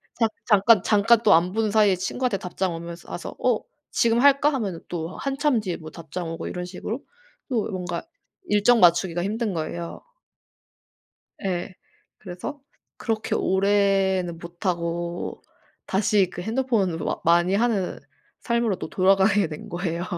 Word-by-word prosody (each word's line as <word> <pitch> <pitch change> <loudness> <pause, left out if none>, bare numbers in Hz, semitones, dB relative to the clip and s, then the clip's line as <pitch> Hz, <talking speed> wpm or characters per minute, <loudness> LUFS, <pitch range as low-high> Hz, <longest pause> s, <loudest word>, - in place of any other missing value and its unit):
잠 225 -2 +2 0.2
잠깐 210 -1 +5
잠깐 220 +2 +4
또 - - +6
안 175 +3 +3
본 215 -1 0
사이에 205 -4 +4
친구한테 210 +4 -1
답장 180 0 -2
오면서 170 +1 -8
와서 175 - -6
어 245 -4 +3 0.3
"지금 235 0 +2
할까?" 285 +2 +5
하면은 195 -9 -3
또 170 0 -5
한참 275 -2 0
뒤에 185 -4 -4
뭐 155 -1 -9
답장 165 +1 -6
오고 165 0 -5
이런 180 -1 -4
식으로 200 +7 -5 0.5
또 235 -5 -1
뭔가 175 -2 -4 0.4
일정 230 - +4
맞추기가 175 -1 +4
힘든 215 0 -1
거예요. 170 +1 -5 1.4
예. 185 0 -2 0.4
그래서 185 +9 -7 0.4
그렇게 220 -2 -2
오래는 190 -2 +2
못 170 +3 -9
하고 170 0 -2 0.4
다시 195 -1 +2
그 180 - -6
핸드폰으로 220 -7 0
어 - - -3
많이 175 +3 +4
하는 210 -4 0 0.4
삶으로 235 -5 0
또 - - -6
돌아가게 195 0 +3
된 150 - -8
거예요. 175 0 -3
190 Hz, 290 characters per minute, -24 LUFS, 175-220 Hz, 1.4 s, 또